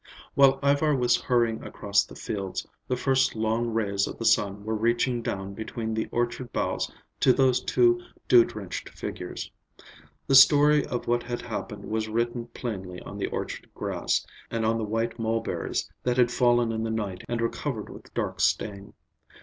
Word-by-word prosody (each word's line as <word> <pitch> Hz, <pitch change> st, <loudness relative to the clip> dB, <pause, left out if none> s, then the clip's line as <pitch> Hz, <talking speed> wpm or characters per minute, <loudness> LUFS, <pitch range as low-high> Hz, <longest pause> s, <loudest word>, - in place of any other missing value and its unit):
While 135 Hz, -1 st, +5 dB
Ivar 145 Hz, +1 st, +3 dB
was 120 Hz, -2 st, +2 dB
hurrying 120 Hz, -3 st, +1 dB
across 100 Hz, 0 st, +1 dB
the -, -, -13 dB
fields, 100 Hz, -3 st, -4 dB, 0.2 s
the 130 Hz, -, 0 dB
first 135 Hz, -1 st, +2 dB
long 110 Hz, +2 st, 0 dB
rays 100 Hz, -3 st, 0 dB
of -, -, -7 dB
the 115 Hz, -, -4 dB
sun 105 Hz, -2 st, +2 dB
were 110 Hz, -, -1 dB
reaching 120 Hz, +2 st, +1 dB
down 95 Hz, -3 st, -4 dB
between 110 Hz, +1 st, -4 dB
the 110 Hz, 0 st, -1 dB
orchard 120 Hz, +1 st, -2 dB
boughs -, -, -1 dB, 0.3 s
to 130 Hz, -, +5 dB
those 130 Hz, -1 st, +3 dB
two 360 Hz, -, +3 dB, 0.3 s
dew 360 Hz, -, +8 dB
drenched -, -, -6 dB
figures. -, -, -6 dB, 0.7 s
The 135 Hz, -, 0 dB
story 145 Hz, +2 st, +7 dB
of 120 Hz, -, -3 dB
what 120 Hz, 0 st, +2 dB
had 120 Hz, 0 st, -5 dB
happened 100 Hz, -2 st, -5 dB
was 110 Hz, 0 st, -2 dB
written 120 Hz, +1 st, -1 dB
plainly 95 Hz, -8 st, -6 dB
on -, -, -8 dB
the -, -, -1 dB
orchard -, -, -5 dB
grass, -, -, -1 dB, 0.2 s
and 115 Hz, -1 st, -1 dB
on 115 Hz, +1 st, +1 dB
the -, -, -2 dB
white 115 Hz, +2 st, -2 dB
mulberries 115 Hz, 0 st, -1 dB
that 125 Hz, 0 st, 0 dB
had 125 Hz, -1 st, +4 dB
fallen 120 Hz, -1 st, +3 dB
in 110 Hz, 0 st, -2 dB
the 115 Hz, -, -2 dB
night 105 Hz, -5 st, -3 dB
and 120 Hz, -1 st, -1 dB
were 115 Hz, -, +2 dB
covered 120 Hz, -8 st, -4 dB
with -, -, -12 dB
dark -, -, -2 dB
stain. 100 Hz, 0 st, 0 dB
115 Hz, 175 wpm, -27 LUFS, 110-125 Hz, 0.7 s, dew